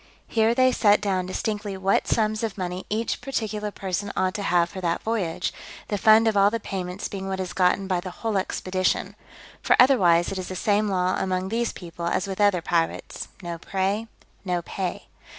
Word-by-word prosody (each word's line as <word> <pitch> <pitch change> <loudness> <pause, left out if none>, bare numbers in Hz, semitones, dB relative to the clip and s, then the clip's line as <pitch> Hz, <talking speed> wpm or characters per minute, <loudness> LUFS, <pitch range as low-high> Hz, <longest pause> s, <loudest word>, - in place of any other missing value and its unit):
Here 225 +1 +2
they 255 0 +5
set 210 -4 +4
down 190 -3 -1
distinctly 205 0 -3
what 190 +1 +1
sums 215 -1 +1
of 220 -3 -3
money 180 0 -4
each 220 +2 -1
particular 215 -5 -3
person 200 0 -3
ought 185 0 +1
to 210 - -4
have 175 -3 +2
for 190 +2 -8
that 170 -2 -1
voyage, 190 -7 -1 0.4
the 205 - 0
fund 220 +2 +6
of 220 - +2
all 200 0 +5
the 230 +2 -2
payments 185 -2 -4
being 195 -1 -6
what 190 0 -2
is 180 -4 -4
gotten 185 +2 +2
by 185 -2 0
the 185 +1 -6
whole 220 +3 -3
expedition; 185 0 -1 0.5
for - - +4
otherwise 180 -10 +5
it 190 - -3
is 185 - -5
the 185 - -5
same 210 +3 +1
law 185 -1 +1
among 185 0 -1
these 235 +2 0
people 170 -1 -7
as 175 - 0
with 195 +1 -4
other 200 -5 +3
pirates. 165 -2 -1 0.2
No 170 -1 -5
prey, 195 +5 -1 0.4
no 180 -3 -1
pay. 185 +1 -4
195 Hz, 195 wpm, -25 LUFS, 180-215 Hz, 0.5 s, fund